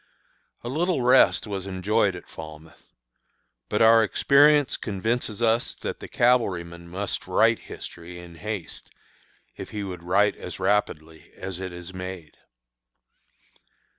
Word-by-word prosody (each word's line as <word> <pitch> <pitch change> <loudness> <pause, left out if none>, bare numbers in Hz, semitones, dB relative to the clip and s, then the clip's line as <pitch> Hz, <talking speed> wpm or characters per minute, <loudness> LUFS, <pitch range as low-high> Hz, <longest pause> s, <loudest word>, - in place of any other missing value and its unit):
A - - -6
little 155 +1 0
rest 130 +2 +5
was 100 -2 -5
enjoyed 100 +1 +1
at 90 - -10
Falmouth. 80 0 -12 0.8
But - - +2
our 115 0 +7
experience 145 +5 +4
convinces 110 +1 -2
us 115 +1 +1
that - - -5
the - - -8
cavalryman 90 -9 +1
must 100 +3 -3
write - - +3
history 85 +1 -9
in 85 -1 -11
haste 100 +1 -6 0.7
if - - -7
he 105 -1 -5
would 90 -3 -6
write 100 +4 +2
as - - -8
rapidly 80 -6 -1
as 95 -1 -6
it 95 -1 -5
is 90 +1 -9
made. 90 -3 -7
95 Hz, 130 wpm, -25 LUFS, 85-115 Hz, 0.8 s, our